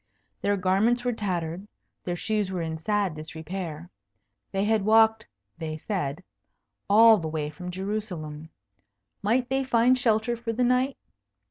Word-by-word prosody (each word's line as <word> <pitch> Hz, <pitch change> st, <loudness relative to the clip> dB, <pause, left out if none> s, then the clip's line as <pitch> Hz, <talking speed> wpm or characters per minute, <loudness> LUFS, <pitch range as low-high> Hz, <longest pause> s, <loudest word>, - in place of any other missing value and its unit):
Their 205 Hz, 0 st, +1 dB
garments 205 Hz, +7 st, +2 dB
were 245 Hz, -, +1 dB
tattered, 180 Hz, -3 st, -3 dB, 0.4 s
their 175 Hz, -, -1 dB
shoes 210 Hz, +1 st, -1 dB
were 180 Hz, -3 st, -2 dB
in 160 Hz, -1 st, -4 dB
sad 200 Hz, +1 st, 0 dB
disrepair. 160 Hz, +1 st, -7 dB, 0.6 s
They 195 Hz, 0 st, 0 dB
had 220 Hz, 0 st, +2 dB
walked 220 Hz, +1 st, +4 dB, 0.3 s
(they 155 Hz, -1 st, -4 dB
said) 165 Hz, -3 st, -3 dB, 0.7 s
all 220 Hz, +1 st, +7 dB
the 160 Hz, -, -4 dB
way 155 Hz, -1 st, -3 dB
from 180 Hz, +4 st, -8 dB
Jerusalem. 180 Hz, -6 st, -5 dB, 0.7 s
Might 240 Hz, +5 st, +1 dB
they 270 Hz, +1 st, +1 dB
find 245 Hz, 0 st, +4 dB
shelter 235 Hz, -1 st, +1 dB
for 230 Hz, -1 st, -4 dB
the 250 Hz, +3 st, 0 dB
night? 250 Hz, +2 st, +2 dB
200 Hz, 140 wpm, -26 LUFS, 165-225 Hz, 0.7 s, all